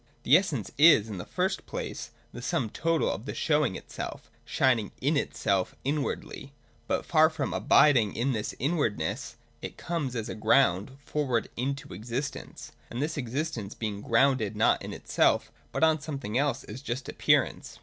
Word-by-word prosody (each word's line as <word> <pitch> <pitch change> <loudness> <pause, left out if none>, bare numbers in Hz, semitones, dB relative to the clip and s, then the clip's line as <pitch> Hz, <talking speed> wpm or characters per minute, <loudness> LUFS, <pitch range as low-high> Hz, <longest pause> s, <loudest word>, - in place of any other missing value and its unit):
The 135 - +6
essence 155 - +1
is, 145 -9 +7
in 100 -4 -5
the 85 - -7
first - - -1
place, - - -5 0.2
the - - -7
sum 110 - -1
total 165 0 +1
of 105 +7 -6
the - - -4
show 150 -1 +2
ing 95 - -1
itself, - - -7
shining 120 -6 +1
in 145 +4 +1
itself 100 -9 0
(inwardly); 140 -1 -3 0.3
but, - - -1
far 160 -1 +5
from 155 - -3
abiding 125 -9 +4
in 125 +4 0
this 110 -4 -3
inwardness, 120 - -1 0.3
it - - -7
comes 150 -7 -3
as 115 -2 -3
a - - -4
ground 110 +1 +2
forward 130 -6 -1
into 135 -1 -3
existence; 120 +9 -5 0.2
and 120 - -5
this 150 +3 -1
existence 125 -5 -3
being 105 -3 -4
grounded 115 -3 +2
not 110 - +3
in - - -6
itself, - - +1 0.2
but - - -1
on 160 -1 +4
something 135 -8 -5
else, 140 +2 +1
is 115 +5 -9
just 130 -1 -4
appearance. - - +1
130 Hz, 165 wpm, -28 LUFS, 110-145 Hz, 0.3 s, is